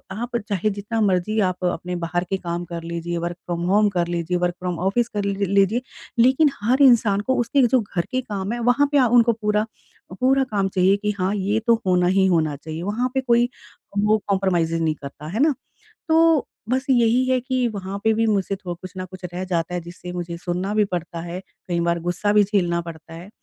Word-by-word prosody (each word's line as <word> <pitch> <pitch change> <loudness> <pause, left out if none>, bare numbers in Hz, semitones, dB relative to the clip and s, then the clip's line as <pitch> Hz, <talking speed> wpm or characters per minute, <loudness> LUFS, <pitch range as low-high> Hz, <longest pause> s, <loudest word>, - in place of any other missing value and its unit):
आप 240 +2 -3
चाहे 205 +1 0
जितना 210 +3 -3
मर्ज़ी 205 +2 +1
आप 185 -1 -1
अपने 180 0 -2
बाहर 175 +1 -1
के 195 - 0
काम 175 -1 -4
कर 170 -1 -6
लीजिए, 170 +1 -4
वर्क 170 +1 -3
फ्रॉम 170 -1 -3
होम 210 +2 +4
कर 175 -3 -1
लीजिए, 175 +1 -1
वर्क 175 0 0
फ्रॉम 180 -1 -3
ऑफ़िस 200 +6 +1
कर 205 - 0
लीजिए, 200 +3 +1 0.4
लेकिन 265 +5 +5
हर 255 +6 +2
इंसान 230 -6 +5
को - - +3
उसके 275 +4 +2
जो 255 +2 +3
घर 180 -4 -3
के 255 - 0
काम 205 -4 -4
हैं, 240 - -3
वहाँ 245 +5 +3
पे 290 - +3
आ 260 -3 +5
उनको 235 0 +4
पूरा 210 -1 0 0.5
पूरा 270 +1 +3
काम 205 -6 -1
चाहिए 190 +1 +3
कि 210 +1 -1
हाँ, 185 +2 +1
ये 205 +2 0
तो 235 - +6
होना 180 -1 +3
ही 190 +1 +3
होना 160 -5 +1
चाहिए। 160 +3 -7
वहाँ 225 +6 -1
पे 265 - +1
कोई 240 -1 +3 0.5
वो 210 +1 +3
कॉम्प्रोमाइज़ेज़ 175 -4 +1
नहीं 155 -1 +1
करता। 145 +1 -9
है 220 - -3
ना? 310 -1 +4 0.6
तो 320 -2 +4 0.2
बस 260 +3 0
यही 240 0 +4
है 260 0 +3
कि 255 0 0
वहाँ 200 -2 -5
पे 220 - +4
भी 225 +1 +1
मुझसे 200 -2 0
थोड़ा 180 -3 -6
कुछ 185 0 -8
न 185 - -3
कुछ 185 -1 -11
रह 180 +1 -3
जाता 180 -1 -2
है, 175 - -1
जिससे 175 +1 -9
मुझे 175 -1 -5
सुनना 180 +3 -3
भी 215 -1 +4
पड़ता 170 -1 -4
है, 175 +2 -6 0.3
कई 170 -1 0
बार 170 0 +1
गुस्सा 175 +4 0
भी 210 0 +5
झेलना 180 -4 0
पड़ता 165 -1 -10
है 170 +3 -10
195 Hz, 220 wpm, -22 LUFS, 175-230 Hz, 0.6 s, तो